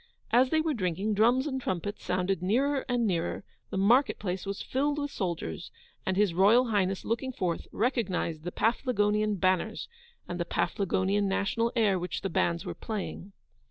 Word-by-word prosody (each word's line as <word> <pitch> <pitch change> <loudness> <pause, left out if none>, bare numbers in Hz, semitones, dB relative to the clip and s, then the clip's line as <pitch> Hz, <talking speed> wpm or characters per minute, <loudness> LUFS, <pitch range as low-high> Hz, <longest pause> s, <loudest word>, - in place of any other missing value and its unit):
As 255 +2 +5
they 315 +2 +2
were 315 -1 0
drinking, 195 - -1
drums 240 +6 +3
and 265 -3 -2
trumpets 205 0 -3
sounded 180 0 0
nearer 265 +9 +1
and 245 -1 +1
nearer, 180 -1 -1 0.3
the - - -4
marketplace 200 -3 +2
was 200 0 -4
filled 285 +3 0
with 290 -1 -2
soldiers, 170 - -4 0.4
and 190 0 0
His 205 -4 +3
Royal 220 +7 +5
Highness 195 -3 0
looking 235 +4 -1
forth, 180 -8 -2
recognised 195 - -1
the 175 - -4
Paflagonian 210 -3 +1
banners, 185 -1 0 0.4
and 175 - -5
the 175 - 0
Paflagonian 195 +2 0
national 210 +4 0
air 205 -5 +3
which 180 +1 -4
the 195 - -3
bands 170 0 0
were - - -4
playing. 205 -2 -6
205 Hz, 160 wpm, -29 LUFS, 185-240 Hz, 0.4 s, As